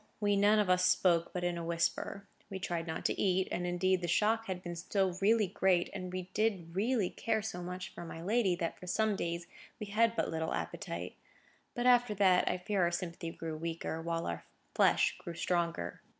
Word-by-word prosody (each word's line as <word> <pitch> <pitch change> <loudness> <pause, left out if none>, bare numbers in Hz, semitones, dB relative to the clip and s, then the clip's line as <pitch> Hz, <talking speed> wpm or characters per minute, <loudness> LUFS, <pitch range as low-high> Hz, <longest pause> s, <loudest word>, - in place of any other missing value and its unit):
We 205 -1 +2
none 205 +2 +5
of 210 -2 +3
us 180 0 +3
spoke 175 -2 +3
but 180 - -3
in 175 -1 -1
a - - -4
whisper: 170 +4 -1 0.2
we 195 - -4
tried 175 -3 -3
not 160 - -4
to - - 0
eat; 190 -1 +2
and 180 0 -1
indeed 185 +1 +1
the 175 - -2
shock 220 +6 +2
had 185 -1 -4
been 175 -1 -5
so 190 +2 0
really 215 +2 +4
great, 180 -1 +1
and 185 -2 -5
we 185 0 -3
did 195 -6 0
really 215 -1 +1
care 220 -2 -1
so 180 -4 -4
much 180 +1 -5
for - - -8
my 165 -1 -7
lady, 195 +1 +2
that 170 -2 -3
for 180 - -10
some 215 +3 +1
days 170 -2 -3 0.3
we 210 - -4
had 225 +3 +2
but - - 0
little 160 0 -1
appetite. - - -5 0.6
But 240 -1 -1
after 245 -3 +5
that, 190 -2 +4
I - - 0
fear 195 +2 -1
our 170 - +4
sympathy 175 -1 -4
grew 165 -1 -5
weaker, 165 0 -4
while 165 0 -2
our 85 - -4 0.3
flesh - - +3
grew 170 - -7
stronger. 170 -1 -1
180 Hz, 205 wpm, -33 LUFS, 170-205 Hz, 0.6 s, none